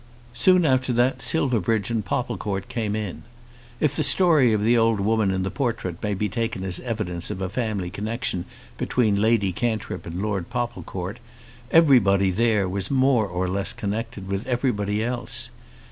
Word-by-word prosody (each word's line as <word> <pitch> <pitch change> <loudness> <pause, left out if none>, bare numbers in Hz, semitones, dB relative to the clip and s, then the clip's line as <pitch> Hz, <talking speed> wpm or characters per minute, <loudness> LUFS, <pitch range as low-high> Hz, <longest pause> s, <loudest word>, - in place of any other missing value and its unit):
Soon 180 +9 +5
after 130 -2 +2
that 120 +2 +2
Silverbridge 115 - +1
and 115 -2 0
Popplecourt 105 -5 -3
came 115 -5 -2
in. 100 -7 -4 0.6
If 150 - +1
the - - 0
story 155 -10 +4
of 105 -1 +1
the 115 +3 +4
old 115 -2 +3
woman 110 0 +2
in 95 0 0
the 95 - -2
portrait 115 - -3
may 105 -1 -1
be 105 +2 -1
taken 115 -1 -3
as 90 -2 -1
evidence 105 -8 -4
of - - -4
a 95 -1 -2
family 100 -5 -2
connexion 110 -3 -3 0.3
between 105 -5 +1
Lady 110 -3 +2
Cantrip 110 -4 -3
and 85 +2 -5
Lord 100 -4 -2
Popplecourt, 120 -4 -4 0.5
everybody 105 - +5
there 105 -1 +2
was 95 +1 -2
more 130 -5 +3
or 90 0 -2
less 95 +2 -1
connected 105 -1 -4
with 100 +2 -3
everybody 110 -5 0
else. 120 +1 -3
110 Hz, 160 wpm, -24 LUFS, 95-120 Hz, 0.6 s, Soon